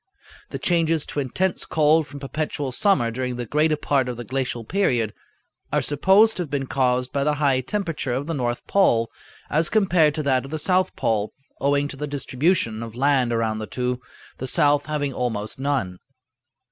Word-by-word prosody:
The - - -4
changes 165 -3 +1
to - - -4
intense 175 +7 -1
cold 155 0 +3
from 140 +1 -9
perpetual 145 -1 -3
summer 155 - +2
during 125 +1 -3
the 120 0 -4
greater 150 +5 +1
part 135 -3 0
of 120 - -5
the 120 - -5
glacial 125 -1 -2
period 120 - 0 0.6
are - - +2
supposed 190 +9 +4
to - - -1
have 165 - -5
been 140 -1 -2
caused 125 -1 0
by 140 - +1
the 150 +1 +1
high 140 -3 +2
temperature 165 -3 -2
of 135 +3 -2
the 165 - -3
north 120 -4 -2
pole 115 - +2 0.4
as 155 +2 +3
compared 180 -8 +3
to 155 - -2
that 130 -2 +2
of 135 - -9
the 155 - -3
south 185 +4 +1
pole, 110 -2 -1 0.3
owing 140 +1 +1
to 140 - -7
the 150 +2 -4
distribution 140 -4 0
of 115 -1 -7
land 135 -2 +2
around 110 -2 0
the 110 - -5
two, 125 +1 -2 0.4
the 130 - -4
south 145 +2 +2
having 145 -3 -2
almost 110 -3 -3
none. 135 -11 -1
140 Hz, 185 wpm, -23 LUFS, 125-155 Hz, 0.6 s, supposed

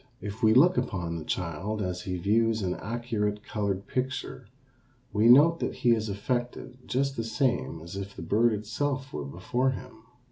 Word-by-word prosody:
If 105 +3 -7
we 110 -1 +5
look 175 +7 +6
upon 85 -4 -2
the 80 - -6
child 90 +6 -3
as 90 -1 -3
he 95 -4 -3
views 110 +3 +2
an 90 -1 0
accurate 105 -2 -2
colored 100 -2 -2
picture 130 -1 -3 0.7
we 105 +2 +4
note 150 +7 +7
that - - -2
he 120 - +6
is 110 -2 +1
affected 125 +4 -4
just 135 +1 0
the 115 - -2
same 120 - 0
as 85 +3 -8
if 100 0 -6
the - - -7
bird 115 +3 +3
itself 130 +6 -2
were 75 -1 -4
before 105 - -1
him. 125 -3 -7
110 Hz, 175 wpm, -28 LUFS, 100-125 Hz, 0.7 s, note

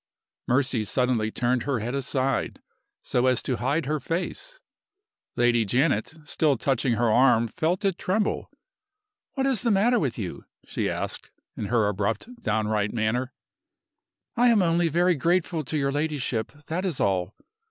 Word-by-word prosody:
Mercy 130 -3 +1
suddenly 120 -1 0
turned 125 +2 0
her 140 0 -1
head 115 +3 -3
aside, 135 -1 -1 0.4
so 125 +1 +1
as 125 -2 +2
to 125 - -1
hide 140 +5 0
her 150 +2 -1
face. 185 - -4 0.8
Lady 120 -1 +3
Janet, 125 +4 +1
still 150 -1 +1
touching 130 0 +1
her 115 0 +2
arm, 120 -1 +4
felt 175 - -1
it 190 -2 0
tremble. 205 +3 -1 0.9
"What 270 -1 0
is 265 -5 +1
the 245 - +1
matter 230 +4 +3
with 135 - -1
you?" 95 -6 -6 0.2
she - - -2
asked, - - -4 0.3
in - - -4
her 110 0 +2
abrupt, 110 - -3
downright 105 -1 0
manner. 120 +3 -1 1.0
"I 245 0 +4
am 225 -5 +5
only 170 0 +2
very 175 +3 +3
grateful 170 +1 0
to 155 - -2
your 140 -1 +1
ladyship 145 -6 -2
that 175 +4 -2
is 180 -8 -2
all." 95 0 0
135 Hz, 150 wpm, -26 LUFS, 115-170 Hz, 1.0 s, am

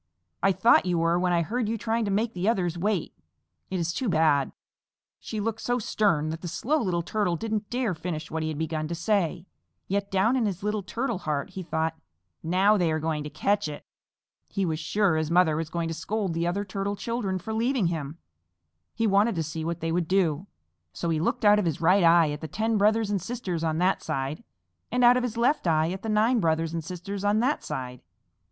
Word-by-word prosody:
"I 195 - +4
thought 210 -1 +4
you 175 -1 +1
were 165 +1 +2
when 180 0 +1
I 170 -1 +2
heard 225 +4 -2
you 230 - -1
trying 225 +1 -1
to - - -2
make 215 +4 0
the 185 +4 0
others 180 -6 0
wait. 190 0 -1 0.6
It 185 - -2
is 170 0 -1
too 250 +2 -1
bad." 155 -5 +3 0.7
She 215 - -5
looked 225 +1 -2
so 245 0 0
stern 200 -9 +1
that 160 +1 -6
the 175 - -5
Slow 265 - 0
Little 175 -5 0
Turtle 200 -1 0
didn't 215 +3 -3
dare 245 -5 0
finish 160 -2 -5
what 160 0 -2
he 155 - -1
had 155 - -4
begun 155 0 -2
to 170 - -3
say, 175 -2 0 0.4
yet 200 +1 -1
down 195 +6 +2
in 240 -4 +1
his 195 -1 -4
little 210 0 -1
Turtle 235 +1 -3
heart 150 -5 -3
he 190 - -6
thought, 160 -2 -2 0.4
"Now 190 +5 +3
they 175 -4 +1
are 155 - +1
going 155 -1 -2
to - - -4
catch 205 +4 0
it!" 150 -1 -8 0.6
He 195 - -1
was 160 -2 -2
sure 180 +1 +1
his 155 -1 -1
mother 170 -2 +4
was 160 0 -3
going 170 0 -2
to - - -2
scold 200 +1 -2
the 170 +1 -1
other 200 +4 -1
Turtle 195 +1 -3
children 210 -4 -2
for 200 +5 -5
leaving 235 0 +1
him. 160 -2 -3 0.8
He 230 - 0
wanted 205 +1 +3
to 165 - -1
see 160 +1 -5
what 170 +1 -3
they 165 0 -1
would 170 -1 0
do, 180 -2 +1 0.5
so 165 - -2
he 160 - +1
looked 170 - -1
out 210 0 +7
of 205 - 0
his 160 -4 -1
right 180 +3 +4
eye 165 -2 +5
at 150 - -6
the 160 - -4
ten 220 +6 -1
brothers 210 +1 +2
and 200 -3 0
sisters 190 -5 -4
on 160 -1 0
that 185 +3 +2
side, 135 +9 -3 0.5
and 250 0 +1
out 245 +1 +7
of 250 - +2
his 245 -2 -3
left 245 - +2
eye 160 0 +2
at 190 +1 -5
the 225 - -4
nine 220 +3 +3
brothers 165 -2 0
and 165 -1 -3
sisters 185 +4 -6
on 205 +1 +2
that 260 +6 +1
side. 125 -1 -5
185 Hz, 225 wpm, -26 LUFS, 160-215 Hz, 0.8 s, out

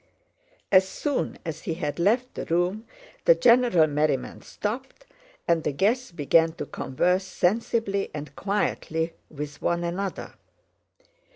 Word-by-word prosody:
As 190 -1 +5
soon 290 +5 -2
as 160 -1 -5
he 165 - -3
had 150 -2 -3
left 235 +8 +2
the - - -5
room 180 +6 0 0.4
the - - +7
general 235 - +5
merriment 150 -3 -1
stopped 260 - -5 0.4
and 165 -2 +2
the - - 0
guests 215 - +1
began 165 +1 +3
to - - -5
converse 180 +8 0
sensibly 200 +2 0
and 145 -1 -7
quietly 165 -5 -1 0.2
with 145 -1 -7
one 170 0 0
another. 185 +3 -4
180 Hz, 125 wpm, -26 LUFS, 160-215 Hz, 0.4 s, the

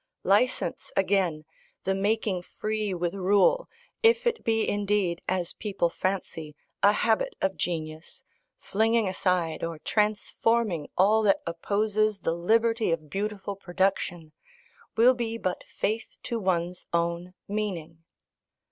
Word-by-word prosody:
License 210 +7 +1
again, 185 -5 +1 0.4
the 190 - +1
making 200 -1 0
free 215 +3 -3
with 175 -1 -1
rule, 200 - +3 0.3
if 470 +1 +4
it 470 -1 0
be 225 -1 +1
indeed, 200 -4 0
as 180 -2 -1
people 195 -5 -1
fancy, 165 -6 -3 0.3
a 205 - +7
habit 220 +1 +1
of 190 0 0
genius, 160 -2 -4 0.3
flinging 225 +1 +1
aside 180 -4 0
or 165 -1 -3
transforming 210 -2 0
all 210 +4 +5
that 200 -2 +3
opposes 210 +4 0
the 165 - 0
liberty 225 +4 +2
of 155 -3 -3
beautiful 200 0 -3
production, 175 -3 -1 0.7
will 240 +3 +7
be 230 -2 -3
but 185 -5 -3
faith 220 +2 -3
to 235 - -2
one's 180 -2 -1
own 170 +2 -1
meaning. 175 -6 -4
195 Hz, 120 wpm, -27 LUFS, 175-215 Hz, 0.7 s, a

